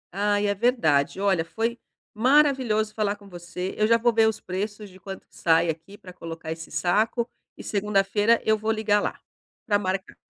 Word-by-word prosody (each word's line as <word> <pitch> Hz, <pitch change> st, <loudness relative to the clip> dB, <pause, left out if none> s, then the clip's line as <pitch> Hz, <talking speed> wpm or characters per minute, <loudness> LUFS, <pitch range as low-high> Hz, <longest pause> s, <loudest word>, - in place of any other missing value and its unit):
Ai 205 Hz, 0 st, +1 dB
é 200 Hz, -, +2 dB
verdade, 190 Hz, -, +1 dB
olha, 195 Hz, -4 st, +2 dB
foi 225 Hz, +7 st, -3 dB, 0.3 s
maravilhoso 250 Hz, -4 st, +3 dB
falar 210 Hz, -1 st, 0 dB
com 205 Hz, -1 st, -17 dB
você, 180 Hz, 0 st, -6 dB
eu 215 Hz, 0 st, +2 dB
já 230 Hz, -, +5 dB
vou 235 Hz, +1 st, +2 dB
ver 225 Hz, 0 st, +4 dB
os 220 Hz, -, -1 dB
preços 205 Hz, +3 st, -5 dB
de 185 Hz, -, -16 dB
quanto 195 Hz, -1 st, -9 dB
que -, -, -25 dB
sai 165 Hz, 0 st, +3 dB
aqui 165 Hz, +6 st, -12 dB
para 185 Hz, -4 st, -12 dB
colocar 165 Hz, -2 st, -7 dB
esse 160 Hz, 0 st, -7 dB
saco, 220 Hz, +6 st, +1 dB, 0.3 s
e -, -, -9 dB
segunda-feira 205 Hz, +2 st, +2 dB
eu 220 Hz, -, +4 dB
vou 215 Hz, +1 st, -1 dB
ligar 215 Hz, -2 st, +2 dB
lá -, -, -3 dB, 0.5 s
para 205 Hz, -3 st, +2 dB
marcar. 190 Hz, -1 st, -3 dB
205 Hz, 185 wpm, -25 LUFS, 185-220 Hz, 0.5 s, já